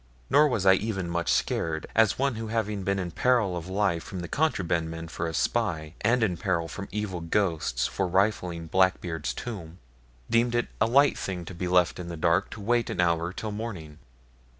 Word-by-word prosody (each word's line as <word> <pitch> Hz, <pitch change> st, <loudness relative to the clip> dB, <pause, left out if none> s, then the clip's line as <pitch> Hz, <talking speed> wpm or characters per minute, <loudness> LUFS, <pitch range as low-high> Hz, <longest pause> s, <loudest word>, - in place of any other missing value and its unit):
Nor 150 Hz, +2 st, +6 dB
was 110 Hz, -8 st, -1 dB
I 95 Hz, -, +8 dB
even 95 Hz, -2 st, -1 dB
much 85 Hz, 0 st, 0 dB
scared, 80 Hz, -1 st, 0 dB
as 110 Hz, -2 st, +4 dB
one 140 Hz, 0 st, +1 dB
who 110 Hz, 0 st, -5 dB
having 110 Hz, -2 st, -1 dB
been 100 Hz, +1 st, 0 dB
in 90 Hz, -2 st, -3 dB
peril 115 Hz, -4 st, +2 dB
of 85 Hz, 0 st, -5 dB
life 95 Hz, -3 st, 0 dB
from 95 Hz, -2 st, -6 dB
the 85 Hz, -, -5 dB
contraband 85 Hz, -, 0 dB
men 80 Hz, 0 st, -6 dB
for 85 Hz, +1 st, -3 dB
a 80 Hz, -, -4 dB
spy, 80 Hz, -, -1 dB
and 115 Hz, +2 st, +3 dB
in 90 Hz, -6 st, +1 dB
peril 85 Hz, -2 st, -1 dB
from 100 Hz, +5 st, -7 dB
evil 100 Hz, -4 st, -3 dB
ghosts 80 Hz, -8 st, 0 dB
for 95 Hz, -, -1 dB
rifling 90 Hz, -3 st, 0 dB
Blackbeard's 85 Hz, -5 st, +1 dB
tomb, 85 Hz, -, -7 dB, 0.5 s
deemed 120 Hz, +1 st, +2 dB
it 120 Hz, -, 0 dB
a 110 Hz, -, +5 dB
light 140 Hz, +4 st, +4 dB
thing 90 Hz, -3 st, -4 dB
to 95 Hz, -, -8 dB
be 90 Hz, +1 st, -3 dB
left 90 Hz, 0 st, +3 dB
in 90 Hz, -, -6 dB
the 85 Hz, -1 st, -6 dB
dark 85 Hz, +2 st, +2 dB
to 110 Hz, -, -9 dB
wait 120 Hz, +2 st, +1 dB
an -, -, -4 dB
hour 85 Hz, 0 st, +2 dB
till 105 Hz, +3 st, -5 dB
morning. 95 Hz, -9 st, -6 dB
95 Hz, 200 wpm, -27 LUFS, 85-110 Hz, 0.5 s, I